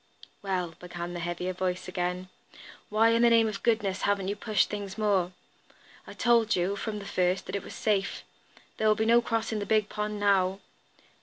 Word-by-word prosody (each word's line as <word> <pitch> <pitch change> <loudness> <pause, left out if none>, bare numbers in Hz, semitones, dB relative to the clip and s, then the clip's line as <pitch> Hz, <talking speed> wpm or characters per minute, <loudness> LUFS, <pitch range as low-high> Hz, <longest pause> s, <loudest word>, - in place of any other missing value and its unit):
"Well," 185 -4 -2
began 175 0 -6
the 175 - -4
heavier 175 +2 -3
voice 185 0 -2
again, 180 0 -3 0.6
"why 220 +2 +4
in 230 0 +3
the 240 - +6
name 230 -1 +5
of 210 -2 -4
goodness 215 -5 0
haven't 200 -2 0
you 200 - -1
pushed 210 -1 +1
things 200 -1 -6
more? 200 -4 +1 0.8
I - - -9
told 235 -3 +3
you, 185 +3 0
from 215 +1 -4
the 200 - -7
first, 185 -1 0
that 185 - -5
all 200 - -2
was - - -10
safe. 205 -3 -1 0.5
There 220 - +1
will 215 - +5
be 220 - 0
no 235 +1 +5
crossing 225 -2 -1
the 205 - -4
big 215 -1 +2
pond 210 0 -3
now. 195 -2 +2
200 Hz, 190 wpm, -28 LUFS, 185-215 Hz, 0.8 s, the